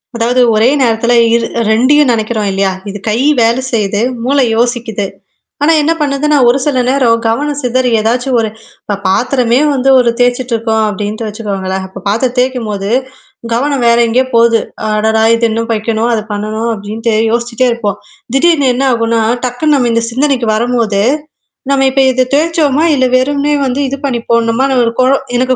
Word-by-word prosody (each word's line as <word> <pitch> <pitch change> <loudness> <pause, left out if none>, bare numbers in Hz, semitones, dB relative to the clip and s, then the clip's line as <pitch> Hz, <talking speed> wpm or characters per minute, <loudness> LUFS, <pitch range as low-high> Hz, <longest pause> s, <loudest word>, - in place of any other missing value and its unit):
அதாவது 240 +2 +1
ஒரே 220 +3 +3
நேரத்தில 235 0 +1 0.2
இரு 235 -1 0 0.2
2ஐயும் 255 +5 +3
நினைக்கிறோம் 220 -2 -1
இல்லையா? 195 0 0 0.2
இது 205 - -6
கை 215 +2 0 0.2
வேலை 230 +2 +2
செயு்து, 205 -2 -1 0.2
மூளை 275 +2 +2
யோசிக்குது. 235 -4 -1 0.6
ஆனா 320 - +4
என்ன 305 +2 +1
பண்ணுதுன்னா, 290 +1 +1
ஒரு 245 - +2
சில 280 -4 0
நேரம் 245 -4 +2
கவனம் 285 +5 -1
சிதறி 250 0 0
ஏதாச்சும் 245 +3 0
ஒரு 220 -1 -1 0.3
இப்ப 205 - -3
பாத்திரமே 245 +4 +1
வந்து 270 0 0
ஒரு 245 -1 +2
தேய்ச்சுட்டுருக்கோம் 235 -3 0
அப்டின்ட்டு 210 +2 -4
வச்சுக்கோங்களேன். 195 -3 -4
அப்ப 190 +1 -11
பாத்திரம் 240 +4 0
தேய்க்கும் 250 -3 -1
போது, 200 -1 -4 0.6
கவனம் 275 +2 -1
வேற 235 0 +4
எங்கேயே 255 +3 +1
போகுது. 230 -1 +4 0.3
அடடா! 220 +1 +1
இது 230 0 +1
இன்னும் 230 +1 -3
வைக்கணும், 225 +1 -1
அது 220 - 0
பண்ணணும் 215 +2 -3
அப்படின்ட்டு 220 +3 -3 0.2
யோசிச்சுட்டே 240 +1 0
இருப்போம். 210 -4 -3 0.4
திடீர்னு 300 -1 +3
என்ன 270 +2 0
ஆகும்னா, 230 -1 0 0.2
டக்குனு 270 +5 0
நம்ம 250 -4 +1
இந்த 230 0 0
சிந்தனைக்கு 260 -1 0
வரும்போது, 230 -3 0 0.7
நம்ம 270 -1 +2
இப்ப 270 +1 +2
இத 255 0 0
தேச்சோமா, 310 -1 +1
இல்ல 260 -2 +2
வெறும்னே 285 +3 0
வந்து 260 +1 -2
இது 275 - -4
பண்ணிப்போடணுமான்னு 235 +1 0
ஒரு 230 - 0
குழ 255 - +3 0.3
எனக்கு 255 +1 +1
235 Hz, 155 wpm, -12 LUFS, 220-260 Hz, 0.7 s, ஆனா